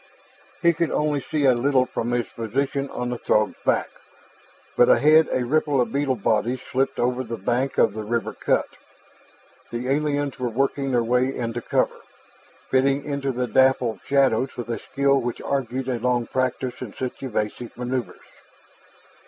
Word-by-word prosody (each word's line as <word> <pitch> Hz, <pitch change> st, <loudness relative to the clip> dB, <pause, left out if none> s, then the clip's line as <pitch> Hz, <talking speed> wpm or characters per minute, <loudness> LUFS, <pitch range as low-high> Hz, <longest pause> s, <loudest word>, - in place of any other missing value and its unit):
He 170 Hz, 0 st, +5 dB
could 165 Hz, 0 st, 0 dB
only 150 Hz, -2 st, 0 dB
see 150 Hz, 0 st, -1 dB
a 130 Hz, -, +6 dB
little 130 Hz, +1 st, +2 dB
from 120 Hz, -1 st, -3 dB
his 120 Hz, -1 st, 0 dB
position 135 Hz, +5 st, -2 dB
on 125 Hz, 0 st, -4 dB
the 120 Hz, -, -4 dB
Throg's 105 Hz, 0 st, +2 dB
back, -, -, +2 dB, 0.9 s
but 120 Hz, -, +5 dB
ahead 155 Hz, +2 st, +5 dB
a 125 Hz, -, 0 dB
ripple 145 Hz, +1 st, +1 dB
of 120 Hz, -3 st, 0 dB
beetle 140 Hz, -2 st, +1 dB
bodies 120 Hz, +4 st, 0 dB
slipped 135 Hz, +1 st, -1 dB
over 125 Hz, +1 st, 0 dB
the 115 Hz, -2 st, -5 dB
bank 125 Hz, +7 st, -1 dB
of 110 Hz, -, +4 dB
the 110 Hz, -, -5 dB
river 115 Hz, +1 st, -2 dB
cut. -, -, +1 dB, 1.0 s
The 120 Hz, +2 st, -4 dB
aliens 145 Hz, -1 st, 0 dB
were 125 Hz, -1 st, -1 dB
working 135 Hz, +3 st, 0 dB
their 120 Hz, -2 st, +2 dB
way 125 Hz, +3 st, +1 dB
into 120 Hz, 0 st, -3 dB
cover, -, -, 0 dB, 0.7 s
fitting 135 Hz, +1 st, +2 dB
into 140 Hz, -2 st, -2 dB
the 125 Hz, 0 st, -1 dB
dapple 130 Hz, -2 st, +2 dB
shadows 135 Hz, -2 st, +2 dB
with 120 Hz, -1 st, -5 dB
a 115 Hz, -3 st, -2 dB
skill 140 Hz, 0 st, +1 dB
which 120 Hz, 0 st, -3 dB
argued 130 Hz, -1 st, -2 dB
a 125 Hz, -2 st, -1 dB
long 120 Hz, 0 st, +1 dB
practice 130 Hz, 0 st, -2 dB
in 120 Hz, -5 st, -7 dB
such 130 Hz, -1 st, -5 dB
elusive 120 Hz, -2 st, -4 dB
maneuvers. 125 Hz, 0 st, -4 dB
130 Hz, 165 wpm, -23 LUFS, 120-140 Hz, 1.0 s, a